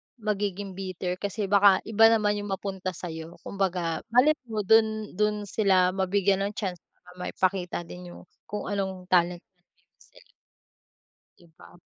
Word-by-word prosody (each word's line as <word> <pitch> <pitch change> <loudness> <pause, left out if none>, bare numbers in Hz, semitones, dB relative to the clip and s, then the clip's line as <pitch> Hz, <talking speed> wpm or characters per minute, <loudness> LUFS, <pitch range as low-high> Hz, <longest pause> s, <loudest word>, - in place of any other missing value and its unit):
magiging 205 -3 -3
bitter 185 -1 -4
kasi 200 +1 -3
baka 200 -1 +5
iba 225 +1 +5
naman 210 -2 +3
'yung 205 - -5
mapunta 190 -1 -3
sa'yo, 165 -1 -7
kumbaga 180 -4 -1
malay 255 +6 +6 0.2
mo 215 -2 -2
do'n 220 0 +3
do'n 210 0 0
sila 185 -3 +3
mabigyan 195 +1 +1
ng 205 +1 -3
chance, 185 -5 -3 0.2
para 180 - -18
maipakita 180 -1 -1
din 180 +1 -10
'yung - - -12 0.3
kung 210 - -4
anong 190 -2 -3
talent 175 -1 +2
na 180 - -48
meron 175 - -43
sila. - - -21 1.1
'Di 175 - -20
ba? - - -16
195 Hz, 150 wpm, -27 LUFS, 180-210 Hz, 1.1 s, malay